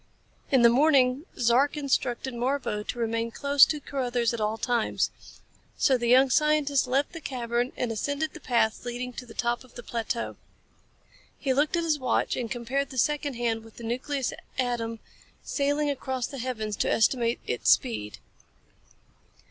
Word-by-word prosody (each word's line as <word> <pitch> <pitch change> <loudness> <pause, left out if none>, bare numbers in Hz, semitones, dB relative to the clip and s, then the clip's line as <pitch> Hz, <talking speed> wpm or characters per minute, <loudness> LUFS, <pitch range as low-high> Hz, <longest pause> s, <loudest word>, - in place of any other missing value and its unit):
In 260 -3 +4
the 235 - +9
morning 270 +2 +3
Zark 255 +6 +3
instructed 265 -2 -1
Marbo 245 -3 -1
to - - -4
remain 230 0 -1
close 280 +3 +5
to 305 - -2
Carruthers 245 -4 -1
at 230 - -3
all 215 +1 0
times. 240 -1 0 0.7
So 270 - +4
the 240 -1 -1
young 260 +2 +5
scientist 300 -3 +2
left 270 +3 +1
the 330 - -7
cavern 245 -2 -2
and 245 -2 -1
ascended 285 +7 -2
the - - -9
path 230 -3 +1
leading 245 +1 -4
to 250 0 -8
the - - -12
top 240 +1 -1
of 255 - -20
the 245 - -8
plateau. 235 0 -3 1.0
He 270 -2 0
looked 290 +5 +2
at 335 - 0
his 310 -3 +1
watch 255 -3 0
and 240 -3 -3
compared 260 +3 -2
the 260 - -9
second 290 +1 0
hand 230 -2 -1
with 225 -1 -16
the 235 - -10
nucleus 255 +3 -2 0.2
atom 240 -3 -1 0.5
sailing 290 +1 0
across 260 -2 -3
the 275 - -7
heavens 220 -4 -3
to - - 0
estimate 235 +1 +2
its 125 - 0
speed. 105 -2 +2
250 Hz, 165 wpm, -27 LUFS, 235-280 Hz, 1.0 s, the